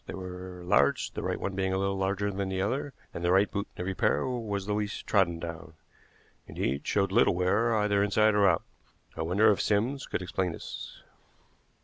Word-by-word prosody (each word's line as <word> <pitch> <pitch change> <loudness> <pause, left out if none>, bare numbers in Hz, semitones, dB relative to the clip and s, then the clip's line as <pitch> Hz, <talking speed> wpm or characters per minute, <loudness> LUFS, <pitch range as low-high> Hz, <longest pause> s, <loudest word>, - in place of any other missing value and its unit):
They - - -5
were 90 -1 -8
large, 70 -5 +2
the - - -5
right - - -2
one 100 - -3
being 95 0 -1
a - - +1
little 100 0 0
larger 100 +1 -1
than 100 0 -3
the 95 0 -2
other, 130 +9 -1 0.2
and 85 - -5
the 85 - +2
right 95 +2 +4
boot 100 0 -3
in - - -6
every 95 +2 -2
pair - - +1
was 110 -6 -3
the 105 - -1
least 105 0 -3
trodden 90 -5 +2
down 85 -1 -7 0.7
indeed, 70 +3 -2
showed 100 -2 +1
little 95 - +4
wear 100 +6 +2
either 105 -1 +2
inside 105 +1 +3
or 100 -1 +4
out. 85 - +1 0.5
I 80 - -4
wonder 100 +7 +4
if 100 - 0
Sims 120 +6 0
could - - -3
explain 90 0 -1
this?" - - -8
95 Hz, 205 wpm, -29 LUFS, 90-105 Hz, 0.7 s, right